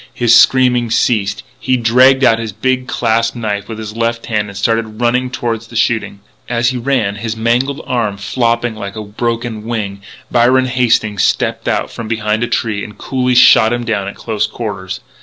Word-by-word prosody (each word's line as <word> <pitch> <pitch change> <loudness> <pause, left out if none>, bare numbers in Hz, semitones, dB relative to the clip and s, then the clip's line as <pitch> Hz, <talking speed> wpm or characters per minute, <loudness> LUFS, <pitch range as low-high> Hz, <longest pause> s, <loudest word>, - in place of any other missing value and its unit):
His 120 -1 +4
screaming 125 0 +4
ceased; 105 -3 0 0.2
he 130 0 +1
dragged 130 +3 +4
out 115 -3 +4
his 115 -2 -4
big 130 +4 -1
clasp 115 -1 0
knife 105 -3 -3
with 110 - -6
his 110 -1 -7
left 115 0 -1
hand 105 -2 -1
and 100 - -9
started 110 +1 -1
running 125 +1 +1
toward 115 -3 -3
the 115 +1 -14
shooting. 115 -3 0 0.3
As 120 -1 +1
he 130 - -3
ran, 120 -6 0
his 115 +1 -4
mangled 125 +6 0
arm 115 -5 -1
flopping 115 +3 -1
like 100 -1 -7
a 110 - -5
broken 115 +1 -3
wing, 105 -4 -4 0.3
Byron 125 +2 +3
Hastings 120 -5 +1
stepped - - 0
out - - -1
from 115 - -7
behind 110 -1 -1
a - - 0
tree 105 -4 -1
and 105 - -9
coolly 125 -1 -1
shot 110 -2 +6
him 120 0 -1
down 105 -4 -2
at 100 - -6
close 110 -2 -2
quarters. 100 -4 -6
115 Hz, 185 wpm, -15 LUFS, 110-120 Hz, 0.3 s, shot